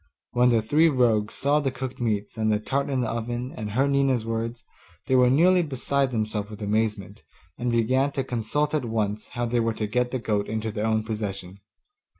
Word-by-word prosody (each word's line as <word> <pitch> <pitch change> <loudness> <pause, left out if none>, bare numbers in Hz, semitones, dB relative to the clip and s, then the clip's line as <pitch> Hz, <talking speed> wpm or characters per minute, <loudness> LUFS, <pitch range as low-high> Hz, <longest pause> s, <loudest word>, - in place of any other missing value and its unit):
When 125 0 +4
the 115 -3 +3
three 155 +8 +4
rogues 115 -6 +2
saw 145 +2 +2
the 140 -2 0
cooked 130 -1 -6
meats, 105 -3 -1
and 110 -1 +1
the 105 - +3
tart 140 +6 -1
in 135 -2 0
the 120 - -1
oven, 120 +3 -3
and 105 -1 -5
heard 135 +4 +2
Nina's 135 -4 +2
words, 115 +1 -3 0.4
they 130 - -1
were 125 -1 +5
nearly 175 +7 +5
beside 140 -2 0
themselves 110 -3 -2
with 105 0 -8
amazement, 105 -1 -1 0.3
and 120 0 -2
began 130 +4 +2
to 135 - -1
consult 125 +6 -1
at 150 -5 0
once 110 -2 -2
how 120 - 0
they 120 0 0
were 115 -1 0
to 110 - -2
get 125 +4 0
the 130 - -2
goat 105 -4 -1
into 110 0 -2
their 105 +1 -2
own 110 -1 +1
possession. 100 -4 -5
115 Hz, 205 wpm, -25 LUFS, 110-130 Hz, 0.4 s, were